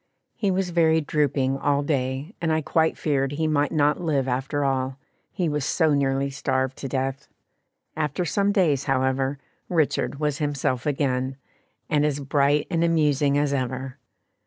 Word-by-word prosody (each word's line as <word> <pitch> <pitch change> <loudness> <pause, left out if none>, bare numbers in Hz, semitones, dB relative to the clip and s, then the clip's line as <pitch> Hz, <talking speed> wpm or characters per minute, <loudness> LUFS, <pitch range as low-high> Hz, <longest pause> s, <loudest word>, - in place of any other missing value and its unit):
He 210 -4 0
was 185 -1 0
very 160 -1 +4
drooping 140 -3 0
all 145 0 +1
day, 135 +3 -2
and 165 -2 +1
I 160 0 +1
quite 160 +2 +1
feared 140 -2 0
he 160 +2 -1
might 145 -2 +1
not 150 0 +2
live 145 -6 0
after 135 +3 -1
all, 130 -1 -1 0.3
he 180 -4 -1
was 150 -2 -1
so 160 +1 +2
nearly 140 0 +1
starved 130 -1 -1
to 135 - -5
death. 135 +1 -3 0.7
After 155 +3 -1
some 200 +5 +1
days, 160 -9 +2
however, 135 0 0 0.3
"Richard 155 -4 0
was 150 -2 -1
himself 140 -3 -1
again," 130 -2 -1 0.5
and 150 -1 +2
as 145 -1 0
bright 145 +1 +2
and 165 -1 +1
amusing 150 -4 +2
as 145 -1 +1
ever. 130 0 -3
145 Hz, 160 wpm, -24 LUFS, 135-155 Hz, 0.7 s, very